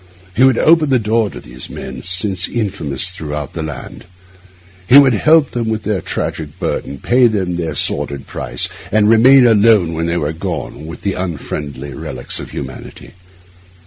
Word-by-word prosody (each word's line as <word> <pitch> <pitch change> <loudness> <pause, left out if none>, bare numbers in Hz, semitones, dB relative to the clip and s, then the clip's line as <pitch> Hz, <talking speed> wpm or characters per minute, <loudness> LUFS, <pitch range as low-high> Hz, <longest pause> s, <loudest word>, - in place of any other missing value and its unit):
He 125 - +3
would 130 -3 +5
open 160 -2 +4
the 130 - +4
door 110 -1 +1
to - - -9
these 60 +2 -8
men, - - -7
since 90 +1 0
infamous 95 - -2
throughout 75 -5 -6
the 85 - -4
land. 75 -4 -7 0.8
He 130 - +8
would 140 -3 +7
help 155 +5 +4
them 115 -2 -2
with 110 -1 -2
their 105 -4 -1
tragic - - -4
burden, 70 - -3
pay 125 - +3
them 95 -6 -1
their 80 -3 -3
sordid 70 -1 -1
price, - - -2 0.2
and 105 0 +3
remain 125 +4 +6
alone, 105 -6 +4
when 80 +1 -2
they 85 +1 0
were 75 -1 -2
gone, 80 -1 -5
with 80 - -9
the 100 - 0
unfriendly 75 -5 -5
relics - - -3
of - - -8
humanity. - - -9
95 Hz, 170 wpm, -16 LUFS, 80-115 Hz, 0.8 s, He